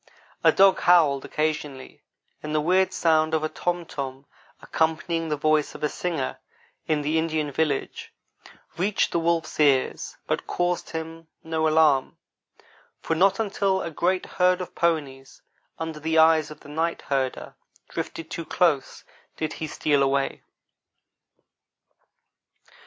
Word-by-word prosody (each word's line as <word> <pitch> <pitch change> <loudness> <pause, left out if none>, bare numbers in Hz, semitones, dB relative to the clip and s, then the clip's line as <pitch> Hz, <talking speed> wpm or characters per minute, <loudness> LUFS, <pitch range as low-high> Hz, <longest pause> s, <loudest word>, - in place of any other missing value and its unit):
A - - +7
dog 195 0 +5
howled 155 -6 +4
occasionally, 150 -3 -3 0.4
and 150 0 -4
the - - +3
weird 185 +5 +2
sound 160 -1 +2
of 155 - -1
a 155 - -1
tom 175 +1 -2
tom 135 -2 -6 0.3
accompanying 165 +1 -1
the 150 - -1
voice 155 0 +1
of - - -9
a 150 - +2
singer 165 -6 -3 0.5
in 150 -2 0
the 155 +2 +1
Indian 155 -2 -1
village 145 -1 -2 0.7
reached 200 +3 +1
the 170 - +1
wolf's 165 -1 -1
ears, 140 -3 +2
but - - -2
caused 175 0 -1
him 165 0 -7 0.2
no 160 -1 0
alarm; 155 -4 +3 0.8
for 165 - -2
not 190 +6 +3
until 195 -3 0
a 170 - -5
great 180 +4 0
herd 180 0 +2
of 180 - -6
ponies, 145 -6 -2 0.3
under 160 -1 -5
the 160 +1 -1
eyes 160 -1 +5
of 150 -1 -12
the - - -14
night 165 +3 -2
herder, 135 -2 -2 0.3
drifted 165 -1 -6
too 165 - -4
close, 155 -6 0 0.3
did 155 -1 -3
he 160 - -5
steal 145 -1 +1
away. 135 0 0
160 Hz, 140 wpm, -25 LUFS, 150-170 Hz, 0.8 s, A